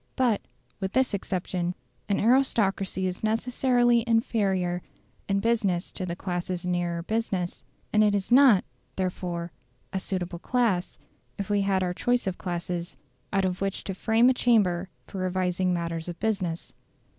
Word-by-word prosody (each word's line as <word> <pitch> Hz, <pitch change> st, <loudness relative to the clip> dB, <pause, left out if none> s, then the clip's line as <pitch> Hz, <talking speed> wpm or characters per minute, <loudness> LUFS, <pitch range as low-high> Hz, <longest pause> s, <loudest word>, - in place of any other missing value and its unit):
But, 245 Hz, -5 st, +2 dB, 0.4 s
with 190 Hz, -1 st, -3 dB
this 260 Hz, -3 st, +2 dB
exception, 180 Hz, -2 st, -2 dB, 0.3 s
an 200 Hz, -, +2 dB
aristocracy 205 Hz, -6 st, +2 dB
is 185 Hz, +2 st, -3 dB
necessarily 240 Hz, +1 st, +2 dB
inferior 195 Hz, -6 st, +1 dB, 0.5 s
in 195 Hz, 0 st, +2 dB
business 205 Hz, -6 st, +1 dB
to 185 Hz, -, -5 dB
the 170 Hz, -, -3 dB
classes 180 Hz, -1 st, -3 dB
nearer 175 Hz, -1 st, -1 dB
business; 195 Hz, -4 st, -2 dB, 0.3 s
and 215 Hz, 0 st, +5 dB
it 205 Hz, -1 st, +3 dB
is 200 Hz, +3 st, -2 dB
not, 250 Hz, -6 st, +7 dB, 0.3 s
therefore, 175 Hz, -2 st, -3 dB, 0.4 s
a 190 Hz, -, 0 dB
suitable 185 Hz, -2 st, -3 dB
class, 220 Hz, -6 st, 0 dB, 0.4 s
if 200 Hz, 0 st, -3 dB
we 205 Hz, -1 st, +3 dB
had 195 Hz, -1 st, +1 dB
our 180 Hz, -1 st, -1 dB
choice 245 Hz, +6 st, +1 dB
of 190 Hz, -2 st, -3 dB
classes, 175 Hz, -1 st, -4 dB, 0.3 s
out 195 Hz, -1 st, +2 dB
of 180 Hz, 0 st, -2 dB
which 195 Hz, 0 st, -1 dB
to 195 Hz, -, -4 dB
frame 225 Hz, +5 st, +3 dB
a 260 Hz, -, +6 dB
chamber 195 Hz, -8 st, +2 dB
for 195 Hz, -, -8 dB
revising 185 Hz, 0 st, 0 dB
matters 170 Hz, -1 st, -2 dB
of 175 Hz, -, -7 dB
business. 190 Hz, -6 st, -2 dB
190 Hz, 150 wpm, -27 LUFS, 180-220 Hz, 0.5 s, not